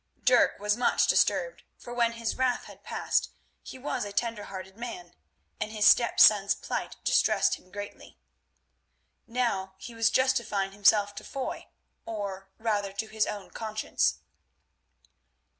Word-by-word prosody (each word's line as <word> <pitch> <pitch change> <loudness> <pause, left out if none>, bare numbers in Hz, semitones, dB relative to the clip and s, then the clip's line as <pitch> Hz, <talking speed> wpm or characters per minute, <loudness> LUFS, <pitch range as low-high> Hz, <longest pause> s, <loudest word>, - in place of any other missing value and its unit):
Dirk 250 -2 +4
was 210 +1 +1
much 245 +1 +2
disturbed, - - +2 0.2
for 240 - -9
when 235 -1 +1
his 230 -1 -3
wrath 255 -1 0
had - - -14
passed - - -1 0.3
he - - -10
was 265 +3 -3
a 205 - -6
tender 225 0 -2
hearted 190 0 -8
man, 225 -7 -8 0.5
and 215 - -3
his 215 -1 0
stepson's 210 -4 +6
plight - - -4
distressed - - +3
him 185 - -8
greatly. 205 +1 -9 1.1
Now 200 -6 -1
he 235 +5 -9
was 225 -1 +2
justifying 225 -6 +1
himself 205 +1 +3
to - - -6
Foy, 270 -2 -5 0.4
or, 195 -3 -5
rather, 205 -3 -1
to 220 +2 -3
his 215 0 0
own 205 -2 -6
conscience. 215 -1 -1
215 Hz, 140 wpm, -28 LUFS, 200-235 Hz, 1.1 s, stepson's